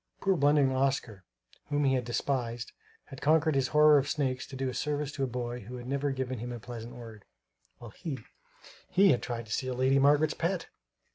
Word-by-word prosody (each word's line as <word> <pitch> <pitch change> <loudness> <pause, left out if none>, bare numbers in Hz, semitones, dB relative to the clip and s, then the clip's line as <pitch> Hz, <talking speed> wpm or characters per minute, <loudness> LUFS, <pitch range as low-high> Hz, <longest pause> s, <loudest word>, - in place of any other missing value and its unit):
Poor 195 -1 +2
blundering 145 -3 +3
Oscar 130 -7 -1 0.4
whom 145 0 0
he 135 -1 +3
had 130 -1 +1
despised 120 -1 -2 0.3
had 135 - -11
conquered 155 +2 +3
his 135 -2 +1
horror 150 0 +6
of 140 - -3
snakes 130 -5 -1
to 135 - -9
do 135 0 -2
a 130 - -3
service 150 0 -2
to 140 - -3
a - - +1
boy 120 0 -4
who 120 +3 -9
had 120 -1 -8
never 140 +2 -1
given 130 -2 -3
him 120 +2 -5
a 120 - -6
pleasant 120 +1 -8
word; 115 -4 -11 0.5
while 120 -2 -11
he 150 +1 -5 0.7
he 195 +1 +5
had 125 - +1
tried 115 -2 -4
to 110 - -12
steal 130 +3 -2
Lady 130 +2 +3
Margaret's 145 +2 +4
pet! 170 +1 -2
135 Hz, 205 wpm, -30 LUFS, 120-145 Hz, 0.7 s, horror